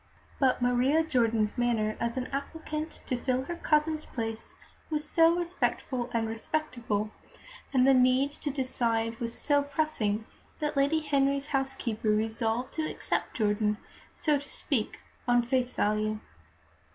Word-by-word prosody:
But 255 -2 +3
Maria 255 +6 +3
Jordan's 230 -7 +1
manner 225 -3 +1
as 235 +2 -2
an 255 - -1
applicant 310 +2 -4
to 255 - -1
fill 255 +1 0
her 345 +6 -4
cousin's 310 -1 +1
place 225 -2 -5 0.3
was 305 -1 -2
so 330 0 +5
respectful 330 -8 -1
and 225 -1 0
respectable, 225 -3 -2 0.6
and 255 -2 +4
the 270 - +6
need 255 +2 +4
to 295 - -4
decide 230 -4 0
was 235 -1 -2
so 290 -1 +3
pressing, 280 -8 0 0.3
that 300 -1 -2
Lady 280 +3 +3
Henry's 280 -1 +2
housekeeper 270 -5 -1
resolved 225 +3 0
to 315 -1 -1
accept - - -2
Jordan, 210 -1 +1 0.3
so 300 -3 +1
to 285 - -10
speak, 240 -7 -2 0.3
on 245 0 +4
face 250 0 +1
value. 215 0 0
255 Hz, 140 wpm, -29 LUFS, 225-290 Hz, 0.6 s, the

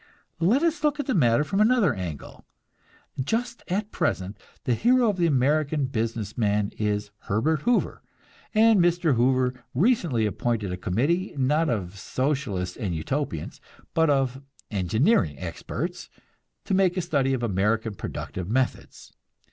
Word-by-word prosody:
Let 215 - +3
us 330 -2 0
look 300 0 +1
at 290 - -1
the 260 - 0
matter 125 - +3
from 195 +6 0
another 215 - +4
angle. 85 -8 -7 0.8
Just 235 - -2
at 205 +4 -2
present 100 - -1 0.3
the 125 - +1
hero 240 - +3
of 195 - -8
the 170 -1 +3
American 145 +1 +2
business 115 -4 -3
man 105 -2 +1
is 105 -1 -1 0.2
Herbert 140 +9 +1
Hoover; 245 - +1 0.5
and 220 -1 +6
Mr. 175 -3 +3
Hoover 125 0 +1
recently 165 - +2
appointed 105 -1 -1
a - - -2
committee, 140 - -1
not 150 +5 +2
of 100 -4 -3
Socialists 130 -8 -2
and 100 -8 -2
"Utopians," 85 - -3 0.3
but 160 -1 +3
of 135 -2 +1 0.3
engineering 100 - +2
experts, - - -5 0.6
to - - -2
make 190 -1 +3
a - - +2
study 140 -6 +1
of 120 - -4
American 110 +1 0
productive 95 -1 -6
methods. 130 +3 -2
135 Hz, 140 wpm, -25 LUFS, 105-175 Hz, 0.8 s, and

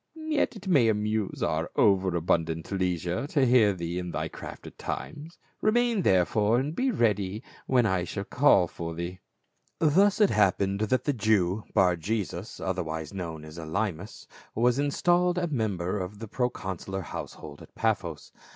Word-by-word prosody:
Yet 315 -2 -1
it 190 - -10
may 140 -11 +4
amuse 105 -1 -1
our - - 0
over 95 -3 +3
abun 85 0 +2
dant 80 +2 -6
leisure 90 - -1
to 145 -3 +2
hear 120 -4 +5
thee 85 -1 -4
in 90 -1 -5
thy - - -3
craft - - -9
at - - -12
times; 155 +2 -6 0.2
remain 235 -1 +2
therefore, 105 - +3
and 145 +5 -1
be 265 +6 +1
ready 105 - 0 0.2
when 125 -3 +3
I 95 -4 +1
shall 100 +2 -4
call 100 -6 +4
for 85 0 -6
thee," 85 +2 -5 0.6
Thus 190 +7 +3
it 210 -3 +5
happened 100 -1 +2
that 110 +4 +1
the 145 - +1
Jew, 105 -3 +1
Bar 90 -2 +4
jesus, 100 +1 -4
otherwise 80 -4 -3
known 80 -5 -6
as 75 +2 -10
P^lymas, 90 +3 -4 0.3
was 120 +3 +2
installed 175 +5 +2
a 180 - +1
member 105 - -1
of 95 +3 -5
the 110 +2 -7
pro 125 +4 0
consular 95 -3 -5
household 75 -2 -8
at - - -15
Paphos. - - -2
105 Hz, 165 wpm, -27 LUFS, 90-130 Hz, 0.6 s, hear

